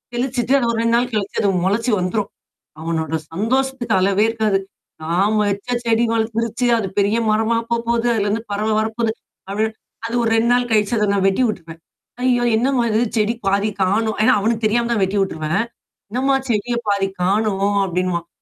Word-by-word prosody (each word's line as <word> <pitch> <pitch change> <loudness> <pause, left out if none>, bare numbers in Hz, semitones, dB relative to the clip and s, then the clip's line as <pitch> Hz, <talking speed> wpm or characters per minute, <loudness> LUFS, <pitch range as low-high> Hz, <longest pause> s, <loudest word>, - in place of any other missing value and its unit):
தெளிச்சுட்டு 250 0 0
அது 240 - 0
ஒரு 225 - -2
2 230 0 +2
நாள் 245 +1 -1
கழிச்சு 205 -2 -2
அது 200 - +2 0.2
மொளச்சு 230 +5 +1
வந்துரும். 195 +3 -1 0.5
அவனோட 160 -1 -2 0.2
சந்தோஷத்துக்கு 245 +4 -1
அளவே 195 +2 +2
இருக்காது. 220 -3 +1 0.5
நாம 195 +7 +1
வச்ச 200 +5 -4 0.2
செடி 230 +1 +2
வளந்துருச்சு 230 +1 -1
அது 200 -4 -2
பெரிய 205 +3 +2
மரமாப் 230 +1 +1
போப் 235 0 -1
போது, 235 0 +1
அதிலருந்து 210 +2 -1
பறவை 215 +2 0
வரப்போது 220 +1 -1 0.4
அப்படி 210 +2 -1
இப்டி 220 - -20 0.3
அது 235 - -4
ஒரு 225 - +1
2 230 +1 +2
நாள் 245 0 +1
கழித்து 210 +1 +2
அத 210 - +2
நான் 195 -1 +1
வெட்டி 195 +6 +1
உட்ருவேன். 165 -5 -7 0.4
"ஐயயோ! 245 -1 +2
என்னம்மா 250 +1 +1
இது 220 +2 +2 0.2
செடி 215 +2 +2
பாதிக் 200 +1 0
காணோம்?" 215 +4 +1
ஏன்னா - - +5
அவனுக்குத் 225 +1 0
தெரியாம 235 +2 +1
தான் 220 -4 +1
வெட்டி 190 +2 -1
உட்டுருவேன். 160 +1 -1 0.5
"என்னம்மா 270 +3 +1
செடிய 235 +2 0
பாதி 200 -1 +1 0.2
காணோம்?" 200 0 +1
அப்படின்னுவான். 175 -1 -2
220 Hz, 175 wpm, -20 LUFS, 200-235 Hz, 0.5 s, ஏன்னா